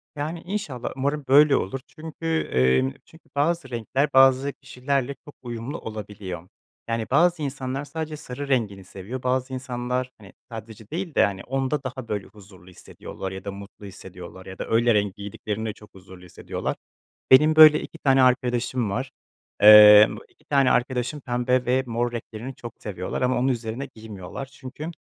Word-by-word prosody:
Yani, 155 Hz, +3 st, -4 dB
inşallah 175 Hz, -, -4 dB
umarım 140 Hz, +2 st, -2 dB
böyle 145 Hz, +2 st, +6 dB
olur 100 Hz, +8 st, -2 dB
çünkü, 160 Hz, +1 st, -10 dB, 0.3 s
eee, 65 Hz, +1 st, +3 dB
çünkü 160 Hz, -, -20 dB
bazı 150 Hz, 0 st, 0 dB
renkler 125 Hz, +4 st, -1 dB
bazı 135 Hz, +1 st, +5 dB
kişilerle 135 Hz, +1 st, -3 dB
çok 145 Hz, -, -13 dB
uyumlu 120 Hz, +4 st, -6 dB
olabiliyor. 100 Hz, -5 st, -7 dB, 0.4 s
Yani, 115 Hz, -1 st, -2 dB
bazı 170 Hz, +3 st, +3 dB
insanlar 135 Hz, 0 st, -4 dB
sadece 155 Hz, 0 st, -5 dB
sarı 140 Hz, 0 st, -7 dB
rengini 110 Hz, -8 st, -1 dB
seviyor, 100 Hz, +7 st, -8 dB
bazı 130 Hz, +1 st, -1 dB
insanlar, 125 Hz, 0 st, -3 dB
hani, 100 Hz, -2 st, -15 dB, 0.2 s
sadece 110 Hz, -1 st, -10 dB
değil 170 Hz, -1 st, -5 dB
de -, -, +5 dB
hani 95 Hz, -2 st, -4 dB
onda 135 Hz, +2 st, -2 dB
daha 130 Hz, -2 st, -6 dB
böyle 105 Hz, -3 st, -4 dB
huzurlu 95 Hz, -3 st, -17 dB
hissediyorlar 95 Hz, +1 st, -9 dB
ya 95 Hz, 0 st, -8 dB
da 100 Hz, -, -3 dB
mutlu 100 Hz, +1 st, -11 dB
hissediyorlar 95 Hz, -1 st, -11 dB
ya 95 Hz, 0 st, -10 dB
da -, -, -4 dB
öyle 115 Hz, +1 st, +3 dB
renk 100 Hz, -2 st, 0 dB
giydiklerinde 105 Hz, +2 st, -5 dB
çok 105 Hz, -, -18 dB
huzurlu 95 Hz, -1 st, -14 dB
hissediyorlar. 90 Hz, -, -5 dB, 0.6 s
Benim, 150 Hz, +4 st, +6 dB
böyle, 155 Hz, -1 st, +9 dB
2 165 Hz, -, -10 dB
tane 135 Hz, -3 st, +3 dB
arkadaşım 125 Hz, -2 st, +1 dB
var, 130 Hz, +7 st, -3 dB, 0.5 s
eee, 105 Hz, 0 st, +10 dB
bu -, -, -9 dB
2 155 Hz, -, -31 dB
tane 140 Hz, -4 st, +2 dB
arkadaşım 125 Hz, +3 st, 0 dB
pembe 125 Hz, 0 st, 0 dB
ve 130 Hz, +2 st, +2 dB
mor 120 Hz, 0 st, -1 dB
renklerini 120 Hz, +2 st, -7 dB
çok 120 Hz, -1 st, -9 dB
seviyorlar 90 Hz, 0 st, -4 dB
ama 125 Hz, 0 st, +1 dB
onu 130 Hz, +2 st, +1 dB
üzerine 120 Hz, +2 st, -5 dB
giymiyorlar. 110 Hz, +2 st, -8 dB
Çünkü, 135 Hz, +3 st, -9 dB
125 Hz, 165 wpm, -24 LUFS, 105-135 Hz, 0.6 s, eee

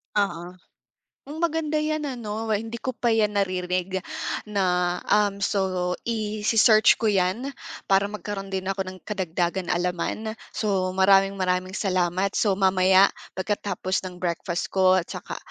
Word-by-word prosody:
Oo. 180 Hz, -3 st, -1 dB, 0.7 s
Hmm, 300 Hz, +3 st, -7 dB
maganda 320 Hz, -2 st, 0 dB
'yan 305 Hz, 0 st, -1 dB
ano. 225 Hz, -4 st, -4 dB
We 215 Hz, -, +2 dB
hindi 230 Hz, +1 st, -6 dB
ko -, -, -3 dB
pa 240 Hz, -1 st, +1 dB
'yan 210 Hz, -2 st, +1 dB
narinig 185 Hz, -1 st, -1 dB, 0.5 s
na 180 Hz, -3 st, +1 dB
um, 205 Hz, -1 st, +2 dB
so 185 Hz, -3 st, 0 dB
ise-search 215 Hz, 0 st, +4 dB
ko -, -, -3 dB
'yan 205 Hz, +6 st, +1 dB, 0.3 s
para 195 Hz, +1 st, +3 dB
magkaroon 205 Hz, -2 st, -6 dB
din 190 Hz, -1 st, -3 dB
ako 195 Hz, 0 st, -1 dB
ng 185 Hz, -, -7 dB
kadagdagan 180 Hz, -2 st, -2 dB
kaalaman. 180 Hz, +5 st, -1 dB, 0.2 s
So 195 Hz, -4 st, 0 dB
maraming 195 Hz, +1 st, +4 dB
maraming 185 Hz, 0 st, -1 dB
salamat. 185 Hz, 0 st, 0 dB
So 200 Hz, -3 st, +2 dB
mamaya, 190 Hz, 0 st, +5 dB, 0.3 s
pagkatapos 190 Hz, -1 st, -2 dB
ng 180 Hz, -, -9 dB
breakfast 175 Hz, -1 st, -3 dB
ko 185 Hz, -1 st, +5 dB
at 175 Hz, -, -1 dB
saka -, -, -6 dB
195 Hz, 140 wpm, -25 LUFS, 185-215 Hz, 0.7 s, mamaya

